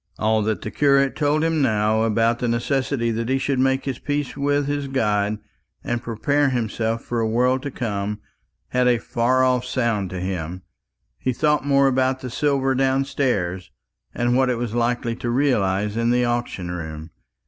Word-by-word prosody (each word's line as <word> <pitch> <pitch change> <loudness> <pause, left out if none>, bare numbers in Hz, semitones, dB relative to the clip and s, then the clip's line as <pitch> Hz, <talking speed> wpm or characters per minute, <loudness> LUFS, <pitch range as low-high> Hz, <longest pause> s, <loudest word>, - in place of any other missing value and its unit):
All 110 0 +2
that 110 0 -1
the 110 - -5
curate 140 +2 +3
told 150 +1 +1
him 165 -2 +1
now 110 -3 +2
about 115 +1 +2
the 125 - -1
necessity 120 +1 0
that 115 +1 -2
he 135 - +2
should 135 -1 -1
make 130 0 +1
his 135 -3 -3
peace 145 -1 -2
with 145 0 +1
his 145 0 -2
God, 105 -5 0 0.5
and 120 0 -2
prepare 140 +5 +1
himself 115 -2 -2
for 120 - -2
a 115 - +1
world 125 +3 +2
to 140 - -4
come, 105 -4 -3 0.5
had 125 0 +2
a 120 -1 +4
far 125 +2 +1
off 125 -1 +2
sound 115 -6 -1
to 95 - -5
him. 90 -1 -4 0.6
He 130 - -1
thought 150 +2 +1
more 140 -1 +4
about 130 0 +1
the 125 - -6
silver 135 -1 +1
downstairs, 130 -9 0 0.4
and 120 0 0
what 130 0 +3
it 125 - 0
was 120 -2 -3
likely 120 0 0
to 125 -1 -3
realize 105 -6 +1
in 115 +1 +1
the 125 0 +2
auction 120 -7 -2
room. 80 -2 -6
120 Hz, 180 wpm, -22 LUFS, 110-135 Hz, 0.6 s, a